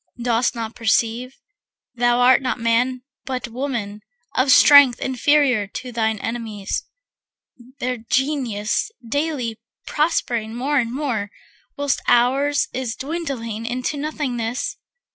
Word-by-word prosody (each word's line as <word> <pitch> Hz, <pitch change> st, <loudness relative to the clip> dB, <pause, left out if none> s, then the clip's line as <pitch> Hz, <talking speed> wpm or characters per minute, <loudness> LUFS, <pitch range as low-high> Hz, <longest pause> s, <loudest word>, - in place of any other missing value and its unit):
Dost 240 Hz, 0 st, +1 dB
not 225 Hz, -1 st, -4 dB
perceive, 230 Hz, +3 st, 0 dB, 0.6 s
thou 240 Hz, 0 st, +2 dB
art 255 Hz, +1 st, +6 dB
not 255 Hz, -1 st, -2 dB
man 245 Hz, +2 st, +1 dB, 0.2 s
but 255 Hz, -2 st, -4 dB
woman, 230 Hz, -5 st, -4 dB, 0.3 s
Of 255 Hz, +2 st, +2 dB
strength 280 Hz, -2 st, +8 dB
inferior 260 Hz, -4 st, +2 dB
to 250 Hz, +5 st, -7 dB
thine 220 Hz, -2 st, 0 dB
enemies, 220 Hz, -3 st, -4 dB, 0.9 s
Their 250 Hz, -1 st, -2 dB
Genius 240 Hz, -, -1 dB, 0.2 s
daily 265 Hz, -5 st, -2 dB, 0.3 s
prospering 240 Hz, -8 st, -1 dB
more 280 Hz, +4 st, +1 dB
and 230 Hz, -2 st, -1 dB
more, 245 Hz, -7 st, -2 dB, 0.5 s
Whilst 285 Hz, -1 st, 0 dB
ours 275 Hz, +4 st, +3 dB
is 250 Hz, -3 st, -3 dB
dwindling 265 Hz, -8 st, -4 dB
into 250 Hz, +4 st, -2 dB
nothingness? 265 Hz, -4 st, -3 dB
245 Hz, 110 wpm, -21 LUFS, 230-275 Hz, 0.9 s, strength